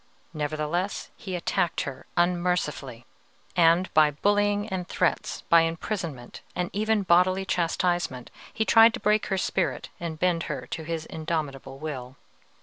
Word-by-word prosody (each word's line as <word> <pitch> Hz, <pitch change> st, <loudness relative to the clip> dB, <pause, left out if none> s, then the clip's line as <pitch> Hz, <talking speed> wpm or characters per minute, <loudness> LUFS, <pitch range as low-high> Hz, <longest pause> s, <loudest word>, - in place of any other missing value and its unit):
Nevertheless, 155 Hz, +5 st, -2 dB
he 190 Hz, -3 st, -6 dB
attacked 170 Hz, -1 st, 0 dB
her 135 Hz, -2 st, -7 dB
unmercifully, 175 Hz, -8 st, 0 dB, 0.5 s
and, 170 Hz, +1 st, +4 dB
by 155 Hz, -1 st, +6 dB
bullying 205 Hz, +6 st, +1 dB
and 185 Hz, -2 st, -3 dB
threats, 180 Hz, -, -1 dB
by 170 Hz, 0 st, +5 dB
imprisonment, 165 Hz, -, -4 dB
and 180 Hz, -1 st, -2 dB
even 215 Hz, 0 st, +1 dB
bodily 185 Hz, +2 st, +3 dB
chastisement, 170 Hz, -6 st, -1 dB, 0.2 s
he 220 Hz, -, -1 dB
tried 225 Hz, +1 st, +7 dB
to -, -, -6 dB
break 210 Hz, 0 st, +2 dB
her 195 Hz, -2 st, 0 dB
spirit 185 Hz, -1 st, -1 dB
and 165 Hz, -2 st, -4 dB
bend 175 Hz, -1 st, +2 dB
her 135 Hz, -4 st, -4 dB
to 160 Hz, -, -4 dB
his 160 Hz, 0 st, -4 dB
indomitable 150 Hz, -5 st, -4 dB
will. 135 Hz, -4 st, -6 dB
170 Hz, 140 wpm, -26 LUFS, 155-185 Hz, 0.5 s, tried